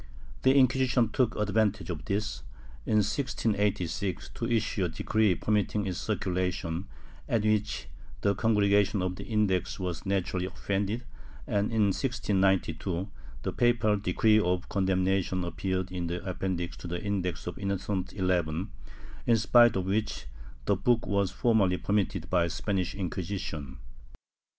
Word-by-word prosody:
The 130 +1 +4
Inquisition 130 -3 +3
took 125 -2 +1
advantage 105 -3 +1
of 80 -3 -6
this, 105 +1 -2 0.5
in 110 - +2
1686, 100 - -1
to 115 - -4
issue 110 -4 +1
a - - -1
decree 105 +3 +1
permitting 105 0 0
its 95 -1 -3
circulation, 90 -3 -2 0.4
at 115 -3 +2
which 105 - 0 0.3
the 100 - +3
Congregation 100 -2 +2
of 90 0 -1
the - - -8
Index 100 -6 0
was 90 -3 -3
naturally 95 -1 -1
offended 100 +5 -2 0.4
and, 100 +1 0
in 105 -3 +3
1692, 95 - 0 0.3
the - - -2
papal 120 -3 +3
decree 105 +2 +3
of 90 -2 0
condemnation 95 -1 +1
appeared 95 +2 -2
in 90 -2 -3
the 90 +2 -4
Appendix 90 -1 -2
to - - -8
the 85 +1 -3
Index 95 -4 -2
of 90 - -5
Innocent 100 -1 -2
XI, 90 -3 0 0.6
in 115 - +5
spite 120 +1 +5
of 95 -1 -1
which 105 - -1 0.4
the 100 - +3
book 115 +5 +2
was 100 -2 +1
formally 95 -2 +2
permitted 100 -4 -1
by 90 -2 +2
the - - -2
Spanish 95 +1 -2
Inquisition. 85 -7 -4
100 Hz, 135 wpm, -29 LUFS, 90-105 Hz, 0.6 s, in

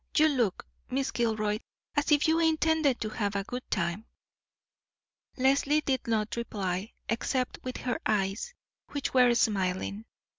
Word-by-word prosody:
You 310 0 +6
look, 240 -9 0 0.2
Miss 265 +1 -1
Gilroy, 215 -3 0 0.4
as 290 +2 +1
if 295 +1 +5
you 320 +1 +3
intended 320 -4 +3
to 215 - -1
have 205 -2 -2
a 200 - 0
good 250 +5 -5
time." 175 +4 -1 1.3
Leslie 275 +3 +3
did 265 -4 -1
not 220 -2 0
reply, 200 -4 -3
except 250 +2 -1
with 255 0 -4
her 250 -2 -2
eyes, 205 - -1 0.4
which 285 -1 -2
were 250 -2 +5
smiling. 200 -1 0
235 Hz, 140 wpm, -29 LUFS, 210-275 Hz, 1.3 s, You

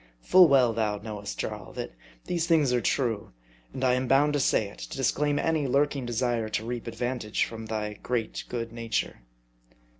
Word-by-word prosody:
Full 185 - +7
well 130 -5 +4
thou 105 -2 0
knowest, 105 -1 -6
Jarl, - - -5
that - - -5 0.3
these 170 -1 -1
things 150 -7 +3
are 120 - +2
true; 115 - -1 0.4
and 130 - -5
I 125 -1 +4
am 125 0 0
bound 140 +3 +4
to 145 - +1
say 110 -5 +2
it, 100 - -13
to - - -7
disclaim 145 +2 +1
any 155 -2 +1
lurking 140 -1 +1
desire 120 -2 0
to 110 +1 -2
reap 120 0 -4
ad 115 - -5
vantage 120 -2 -1
from 115 -1 -8
thy 105 -1 -4
great 120 -3 -2
good 115 -2 -4
nature. 115 -1 -2
120 Hz, 185 wpm, -27 LUFS, 110-140 Hz, 0.4 s, Full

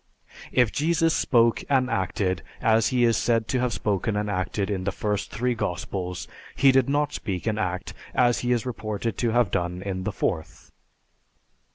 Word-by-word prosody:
If 125 -4 +3
Jesus 165 +1 +2
spoke 115 -2 +3
and 130 -2 +3
acted 95 -4 -1 0.2
as 110 0 +3
he 125 -2 +2
is 115 -1 +4
said 115 -2 +1
to 130 - +1
have 125 -1 0
spoken 105 +1 -1
and 105 0 -1
acted 95 +2 -1
in 95 -2 -2
the 100 - 0
first 105 0 -2
three 125 +2 -1
Gospels, 90 -3 -4 0.3
he 135 -1 +6
did 130 0 +3
not 145 +1 +1
speak 95 -5 -4
and 110 -1 0
act 90 -2 -3 0.2
as 120 -1 +3
he 125 - -1
is 120 -1 +1
reported 110 -2 -3
to 120 - +1
have 120 -3 +2
done 90 0 -2
in 95 -2 -3
the - - -2
fourth." 80 -1 -3
110 Hz, 180 wpm, -25 LUFS, 95-125 Hz, 0.3 s, he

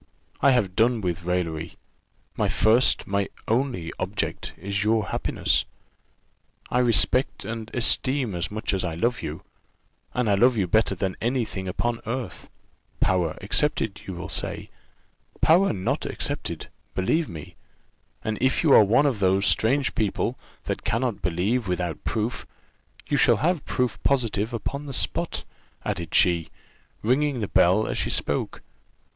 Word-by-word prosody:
I 140 - +6
have 110 -8 +2
done 115 0 +3
with 90 -2 -3
raillery: 85 -2 -2 0.6
my - - +1
first, 115 +4 +3
my 100 0 0 0.2
only 115 -8 -1
object, 95 +2 -3
is 100 +2 -2
your 110 0 +1
happiness. - - +1 1.1
I 125 - +2
respect 115 -3 +3
and 110 +1 -5
esteem 130 -1 +2
as 85 -1 -2
much 110 0 -3
as 95 - 0
I 85 -3 -2
love 120 +7 0
you, 75 +1 -6 0.7
and 125 -2 +1
I 105 - +3
love 120 +4 +4
you 100 - +2
better 105 +2 +2
than 95 0 -2
any 120 +1 +1
thing 95 -3 -6
upon 115 +5 -2
earth 125 +1 -5 0.5
power 90 -4 +1
excepted, 110 -1 0
you 95 - -5
will 90 - -6
say - - -4 0.7
power 180 +5 +5
not 95 -3 -2
excepted, - - -4 0.3
believe 155 - +1
me; 80 -3 -9 0.7
and 110 -1 -2
if 130 +4 +2
you 155 - +4
are - - +9
one 115 +8 +3
of 130 -7 +1
those 95 +1 +3
strange 135 +5 +2
people 110 +3 -1 0.3
that - - -4
cannot 115 -1 -1
believe 100 +7 0
without 90 -2 -2
proof, 110 +2 -2 0.6
you - - 0
shall - - +5
have 170 -1 0
proof 125 -3 -1
positive 115 -5 +1
upon 140 +5 -4
the 135 - -5
spot," - - -1 0.4
added 85 -2 -3
she, 85 -3 +3 0.5
ringing 135 +3 +1
the 105 - -2
bell 95 +5 +4
as - - -2
she - - -1
spoke. - - -2
110 Hz, 150 wpm, -25 LUFS, 95-125 Hz, 1.1 s, are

